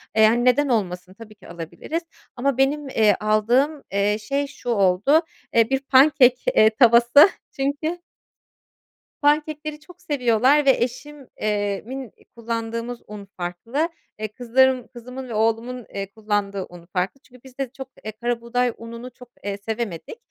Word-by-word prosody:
Eee, 220 0 +6
hani, 240 +3 +2
neden 285 +4 +4
olmasın? 185 -5 -2
Tabii 215 +1 -13
ki - - -17
alabiliriz 170 - -5 0.3
ama 265 +1 0
benim, 280 +1 +1
eee, 215 -5 +3
aldığım, 240 +8 +1
eee, 200 +1 +1
şey 280 +5 -1
şu 265 -3 -8
oldu, 205 - +3 0.3
eee, 230 0 +4
bir, 270 - +1
pancake 265 -1 +5 0.2
eee, 215 - +7
tavası. 235 - +6 0.2
Çünkü 290 +5 -2 1.2
Pancake'leri 300 +1 0
çok 355 +4 -17
seviyorlar 265 +1 +2
ve 270 - +7
eşim 275 +2 -7
eee, 205 -2 -1
min 260 -2 -7 0.2
kullandığımız 230 +1 -4
un 210 -1 -9
farklı. 230 - -2 0.3
Eee, 215 - -2
kızlarım 250 +3 +2
kızımın 250 +2 -9
ve 230 - -5
oğlumun, 230 +3 -1
eee, 195 0 -5
kullandığı 205 -3 -2
un 175 -1 -13
farklı. 195 +8 -2
Çünkü 250 -1 -19
biz 260 -1 -16
de 270 -3 -2
çok, 265 -1 -7 0.2
eee, 215 - -3
karabuğday 240 +2 -1
ununu 235 +2 -9
çok, 250 -1 -15
eee, 200 0 -3
sevemedik. 215 - -5
240 Hz, 150 wpm, -23 LUFS, 215-270 Hz, 1.2 s, eee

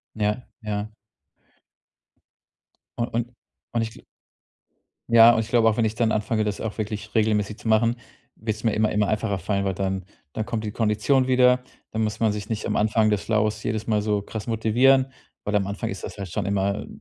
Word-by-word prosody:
Ja 105 +3 -1 0.2
ja. 105 0 -4 2.0
U 120 - 0
und 120 0 -2 0.4
und 115 -1 +1
ich 110 - -3
gl - - -16 1.1
ja 115 0 +8
und - - +1
ich 110 - -4
glaube 115 -2 +4
auch, 110 - +1
wenn 115 - +2
ich 110 - 0
dann 115 -1 +1
anfange, 110 +1 0
das 105 -1 -3
auch 110 -1 -4
wirklich 110 0 -4
regelmäßig 105 -1 +1
zu 110 - -5
machen, 115 +2 +3 0.4
wird's 110 0 -4
mir 110 - +3
immer 110 0 +2
immer 105 -1 +1
einfacher 105 -2 0
fallen, 100 +2 -1
weil 95 -1 0
dann 95 -1 -2 0.3
dann 110 -1 -3
kommt 115 -2 -3
die 105 - -3
Kondition 115 +5 +2
wieder. 125 0 +4 0.3
Dann 110 - -1
muss 110 0 -2
man 110 -2 +3
sich 105 0 -5
nicht 110 -2 -3
am - - -1
Anfang 110 0 +3
des 105 -1 0
Flows 110 -1 0
jedes 110 0 -2
Mal 110 -2 +2
so 105 -1 0
krass 110 +2 -7
motivieren, 130 +4 +3 0.3
weil 105 - -2
am 100 -2 +2
Anfang 100 0 -3
ist 95 - -7
das - - -7
halt 100 -3 -6
schon 100 +1 -2
immer 100 +1 -1
110 Hz, 200 wpm, -24 LUFS, 105-115 Hz, 2.0 s, ja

